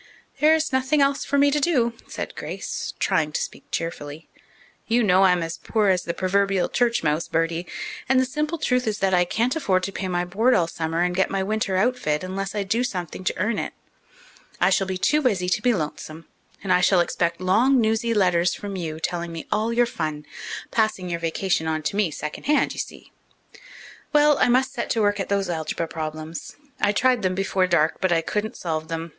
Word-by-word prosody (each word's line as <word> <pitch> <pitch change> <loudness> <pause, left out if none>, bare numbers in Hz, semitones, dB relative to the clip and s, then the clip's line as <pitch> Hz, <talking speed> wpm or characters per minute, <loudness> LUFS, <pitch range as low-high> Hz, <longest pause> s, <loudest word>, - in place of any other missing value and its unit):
"There 305 +2 +6
is 315 -3 -1
nothing 260 +3 +2
else 275 0 +2
for 280 - 0
me 285 0 +5
to 295 - +1
do," 260 -7 +2
said - - -5
Grace, - - -5
trying 160 -6 +1
to - - -1
speak - - -9
cheerfully. 155 -2 -5 0.6
"You 235 +1 +3
know 185 -2 +4
I'm 180 -2 +3
as 165 0 -5
poor 210 +2 +1
as 185 -2 +1
the 170 - -2
proverbial 195 0 +1
church 235 -5 +1
mouse, 155 +1 0
Bertie, 165 +1 -1 0.4
and 265 0 +5
the 260 - +3
simple 300 +5 -2
truth 250 -5 0
is 210 -2 0
that 195 -1 +1
I 180 0 +4
can't 235 - 0
afford 185 -12 +1
to 195 - -2
pay 190 - -4
my 175 -1 -1
board 220 +8 +2
all 170 - +3
summer 165 0 -2
and 180 0 0
get 190 - +2
my 195 -1 -1
winter 215 -1 -1
outfit 195 -8 0
unless 195 +2 -4
I 205 - 0
do 225 +5 0
something 180 -5 -4
to - - -1
earn 210 +3 0
it. - - -4 0.9
I - - +3
shall 195 - +2
be 190 -1 -2
too 300 +10 +2
busy 200 -10 +1
to 210 - +1
be 245 - +3
lonesome, 155 -3 -4 0.4
and 190 -2 +2
I 180 - +4
shall 180 0 +4
expect 170 0 0
long, 225 +9 +3
newsy 225 +1 +1
letters 180 -3 +3
from 200 -1 -6
you, 160 -4 -4
telling 170 +1 -3
me 165 -1 -6
all 220 +2 +1
your 240 +1 +3
fun 155 -9 -4 0.5
passing 215 -5 0
your 170 - -2
vacation 165 0 -1
on 155 -1 -1
to 175 - -2
me 205 -2 +2
at 155 - -8
second 150 0 -6
hand, 295 +1 +2
you - - -8
see. - - -7 1.0
Well, 295 0 +5
I - - +4
must 255 +2 +2
set 235 - -3
to 225 - +1
work 205 0 +2
at 195 - -3
those 200 -1 +1
algebra 165 0 -2
problems. 155 0 -6 0.2
I 205 - +3
tried 250 +2 +2
them 185 -1 0
before 190 -1 +1
dark, 165 -3 +1
but 185 -2 +1
I 165 -1 +3
couldn't 210 +6 -3
solve 160 -2 -3
them. 165 0 -4
190 Hz, 215 wpm, -24 LUFS, 170-230 Hz, 1.0 s, There